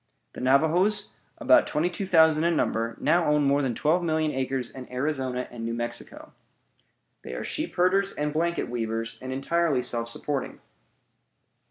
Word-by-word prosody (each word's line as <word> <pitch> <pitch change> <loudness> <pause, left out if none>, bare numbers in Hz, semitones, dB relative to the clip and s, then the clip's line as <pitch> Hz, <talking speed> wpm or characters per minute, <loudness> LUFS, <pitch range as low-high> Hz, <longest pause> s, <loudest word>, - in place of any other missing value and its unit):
The - - -8
Navajoes, 165 +11 +2 0.3
about 315 -1 +4
twenty 155 +3 0
two 185 +2 -4
thousand 160 -3 +5
in 170 0 +2
number, 115 -5 -1
now 175 -1 +2
own 150 -1 +3
more 140 +1 +3
than 130 -4 -1
twelve 160 +8 +2
million 160 -2 0
acres 130 -2 -2
in 130 -2 -10
Arizona 130 -1 -2
and 120 -2 -7
New 115 0 -2
Mexico. 120 - -5 0.9
They - - -7
are - - -4
sheep 315 +2 -4
herders 195 +2 +2
and 150 -3 -3
blanket 170 +2 0
weavers, 115 -1 -3
and 130 0 -6
are - - -3
entirely 145 -1 +1
self 115 -1 -2
supporting. 140 +3 -3
150 Hz, 165 wpm, -26 LUFS, 125-170 Hz, 0.9 s, thousand